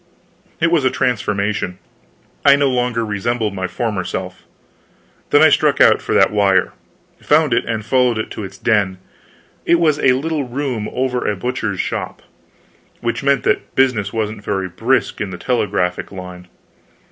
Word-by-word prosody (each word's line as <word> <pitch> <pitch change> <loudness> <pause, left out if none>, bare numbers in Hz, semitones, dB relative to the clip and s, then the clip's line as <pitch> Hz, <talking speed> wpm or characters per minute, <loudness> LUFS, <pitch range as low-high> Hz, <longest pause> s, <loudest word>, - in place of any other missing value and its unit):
It 165 +1 +2
was 165 -5 +3
a 130 - +3
transformation. 105 -6 -1 0.7
I 140 0 +7
no 140 -1 +2
longer 125 -2 0
resembled 105 +1 -2
my 95 -1 -3
former 105 -5 -2
self. 90 +1 -6 0.8
Then - - +5
I - - +8
struck - - +2
out - - +5
for - - -2
that - - +4
wire, 100 -3 +2 0.5
found 150 -3 +3
it 115 - +1
and 110 -2 -3
followed 125 -1 +2
it 110 - -4
to 110 - -6
its 95 0 -9
den. 100 -4 +1 0.7
It 170 - +3
was 155 -3 +2
a 130 - +4
little 150 +2 -2
room 125 -4 -3
over 125 -1 -1
a 105 - -1
butcher's 110 -2 -3
shop - - -4 0.8
which 120 0 -2
meant 140 0 +2
that - - -1
business 120 -7 +2
wasn't 110 -2 -3
very 95 -2 -2
brisk 115 +9 0
in 105 - -2
the 90 - -7
telegraphic 90 -6 -1
line. 90 -1 -9
110 Hz, 160 wpm, -18 LUFS, 100-130 Hz, 0.8 s, I